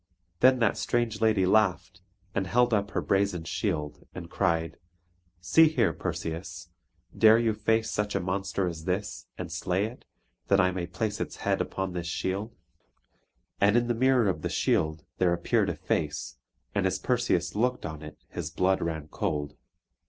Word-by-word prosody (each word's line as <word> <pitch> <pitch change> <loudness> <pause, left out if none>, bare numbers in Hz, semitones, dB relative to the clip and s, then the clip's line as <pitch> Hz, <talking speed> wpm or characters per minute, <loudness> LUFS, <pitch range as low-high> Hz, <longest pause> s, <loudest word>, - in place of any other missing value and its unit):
Then 130 0 +6
that 115 -4 +1
strange 115 -2 -1
lady 110 -4 +3
laughed, 95 -1 +1 0.3
and 95 -2 -1
held 120 +3 +3
up 100 -1 +1
her - - -2
brazen 100 -3 +1
shield, 80 -4 -3
and - - -8
cried: 80 0 0 0.6
"See 160 - +6
here, 115 - +1
Perseus; 85 +2 -5 0.5
dare 110 0 +7
you 115 -1 +2
face 110 +1 0
such 105 0 -1
a - - +2
monster 95 +2 -2
as 80 -2 -6
this, 95 +2 -3
and - - -6
slay 95 +3 0
it, 115 +3 -9 0.4
that 100 - +4
I 95 0 +4
may 90 -2 -3
place 105 +4 -3
its - - -4
head - - +2
upon 95 -1 -3
this 85 -1 -4
shield?" 95 +5 -3 1.0
And 100 +3 +4
in 120 - +2
the 120 - 0
mirror 125 -1 +3
of 95 - -1
the - - -2
shield 80 0 0
there 90 -2 +3
appeared 85 - +1
a - - -2
face 75 -2 -3 0.3
and 100 -1 +1
as 95 0 -1
Perseus 95 -6 0
looked 125 +4 0
on 80 -2 -6
it 75 0 -10
his 85 -4 -5
blood 95 +3 +1
ran 80 -2 -3
cold. 75 -1 -3
95 Hz, 170 wpm, -28 LUFS, 85-110 Hz, 1.0 s, dare